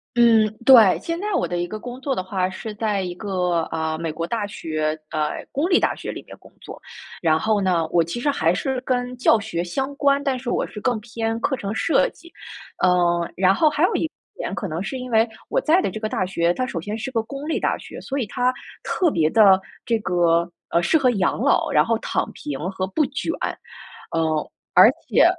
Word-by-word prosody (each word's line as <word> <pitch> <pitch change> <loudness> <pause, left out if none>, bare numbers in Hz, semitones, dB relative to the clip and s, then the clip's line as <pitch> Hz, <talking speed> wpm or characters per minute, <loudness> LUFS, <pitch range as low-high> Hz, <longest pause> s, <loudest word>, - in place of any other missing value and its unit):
嗯， 230 -2 +5 0.2
对， 230 -8 +7
现 335 0 -3
在 415 +3 -3
我 - - +1
的 175 - -3
一 175 - -1
个 215 +4 -6
工 245 +3 -8
作 275 0 -1
的 185 - -2
话 185 0 -1
是 210 +3 -7
在 210 -2 -1
一 180 -1 -4
个， 180 -4 -1
啊， 160 0 -2
美 165 -1 -3
国 165 +2 -4
大 220 -1 -2
学， 155 -5 -3
呃， 150 -1 -2
公 310 +7 0
立 360 - +5
大 - - +1
学 - - -6
里 - - -7
面 - - -13
工 - - -19
作。 - - -11 0.4
然 160 -2 +3
后 215 +2 +1
呢， 175 -4 +1
我 170 - +4
其 170 +9 -5
实 290 - 0
还 165 - +2
是 255 +7 -2
跟 250 -1 -2
教 245 -2 +4
学 200 -5 -3
相 270 +10 -3
关， 280 0 +2
但 270 -2 -1
是 245 -1 -5
我 - - 0
是 210 - -9
更 245 -1 0
偏 225 0 -3
课 265 +3 0
程 205 -4 -4
设 320 - +2
计， 340 - -17 0.5
嗯， 175 -2 +2
然 190 +1 +4
后 305 +7 +4
还 300 +2 -1
有 365 - +3
一 320 - -1 0.2
点 - - -4
可 200 - -3
能 165 +3 -4
是 260 +6 -4
因 255 0 -7
为 225 0 +4 0.2
我 - - 0
在 335 +1 +3
的 - - -1
这 - - -7
个 215 0 -3
大 185 - -1
学， 175 -2 +1
它 255 - -1
首 170 -9 -4
先 210 +5 -4
是 240 +4 -4
个 225 -3 -1
公 275 +6 -7
立 325 - 0
大 - - 0
学， - - -10
所 275 +1 -3
以 245 - -1
它 250 +4 0 0.3
特 350 -4 +1
别 160 -4 +1
地， 225 - 0 0.5
这 230 -1 +1
个， 170 -2 +1 0.2
呃， 170 +1 +2
适 320 - +4
合 260 -4 +3
养 195 -5 0
老， - - +2
然 - - +4
后 230 -1 +1
躺 - - -2
平 140 -2 -6
和 190 0 -2
不 285 +11 0
卷， 285 +4 -3 0.8
呃， 160 -2 0 0.3
而 - - +9 0.2
且 - - +5
215 Hz, 245 characters per minute, -22 LUFS, 175-255 Hz, 0.8 s, 而